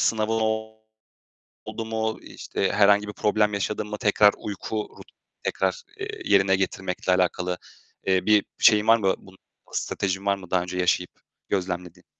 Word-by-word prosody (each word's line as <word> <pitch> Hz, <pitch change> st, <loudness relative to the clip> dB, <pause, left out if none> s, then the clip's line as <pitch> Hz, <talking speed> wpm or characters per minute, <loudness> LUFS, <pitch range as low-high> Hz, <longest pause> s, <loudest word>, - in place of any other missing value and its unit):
sınavın 110 Hz, 0 st, +1 dB, 1.3 s
oldu 115 Hz, -, -5 dB
mu, 110 Hz, 0 st, -2 dB
işte 95 Hz, -, -3 dB
herhangi 105 Hz, 0 st, +4 dB
bir 105 Hz, -, -6 dB
problem 105 Hz, +1 st, +1 dB
yaşadın 105 Hz, +1 st, -2 dB
mı 105 Hz, -, -5 dB
tekrar 105 Hz, 0 st, +4 dB
uyku 105 Hz, +1 st, -4 dB
rut -, -, -13 dB, 0.4 s
tekrar, -, -, -1 dB, 0.2 s
eee, 395 Hz, +2 st, -4 dB, 0.2 s
yerine 95 Hz, -1 st, +4 dB
getirmekle 95 Hz, -1 st, -1 dB
alakalı, 90 Hz, 0 st, 0 dB, 0.5 s
eee, 95 Hz, -1 st, +2 dB
bir 105 Hz, -2 st, +4 dB
şeyin 105 Hz, -1 st, +5 dB
var 115 Hz, +1 st, +7 dB
mı, 95 Hz, -4 st, +1 dB
bu 95 Hz, -, -17 dB, 0.4 s
stratejin 95 Hz, 0 st, -2 dB
var 100 Hz, 0 st, +3 dB
mı 95 Hz, -3 st, -13 dB
daha 90 Hz, -1 st, +3 dB
önce 90 Hz, +1 st, -5 dB
yaşayıp 90 Hz, 0 st, +1 dB, 0.4 s
gözlemlediğin? 90 Hz, -2 st, -3 dB
100 Hz, 150 wpm, -25 LUFS, 95-105 Hz, 1.3 s, var